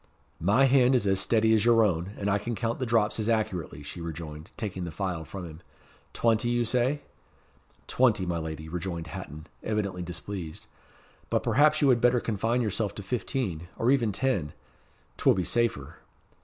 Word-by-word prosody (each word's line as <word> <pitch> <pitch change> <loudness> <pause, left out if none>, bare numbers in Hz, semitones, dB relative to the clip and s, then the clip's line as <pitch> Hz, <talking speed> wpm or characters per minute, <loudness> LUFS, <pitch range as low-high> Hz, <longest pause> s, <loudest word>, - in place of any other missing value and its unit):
"My 105 +10 +4
hand 130 -1 +5
is 120 - +2
as 95 -1 +2
steady 110 -1 +3
as 110 - +3
your 115 -1 +5
own, 90 -1 0
and 100 - -3
I 105 0 +2
can 120 +3 -3
count 115 +1 -2
the 130 - -2
drops 110 -2 +2
as 110 +1 -1
accurately," 95 -10 -1
she 80 +4 -8
rejoined, 80 0 -7
taking 95 -4 -4
the 85 - -4
phial 90 -1 -3
from 95 +1 -7
him. 80 -1 -10 0.5
"Twenty, 115 0 +1
you 120 0 +1
say?" 125 +5 +1 0.8
"Twenty, 115 -7 +2
my 85 -1 -1
lady," 80 -1 -6
rejoined 85 0 -4
Hatton, 75 0 -8 0.2
evidently 100 -4 -2
displeased; 90 -1 -6 0.6
"but - - +1
perhaps 150 +6 +4
you 140 - +5
had 120 -2 +4
better 125 0 +4
confine 115 +2 0
yourself 105 -1 -1
to 100 - -6
fifteen, 95 - -3
or 120 +3 +2
even 120 -6 +2
ten. 95 - -1 0.6
'T - - -8
will - - +6
be 95 - 0
safer." 115 - -1
105 Hz, 180 wpm, -28 LUFS, 85-120 Hz, 0.8 s, will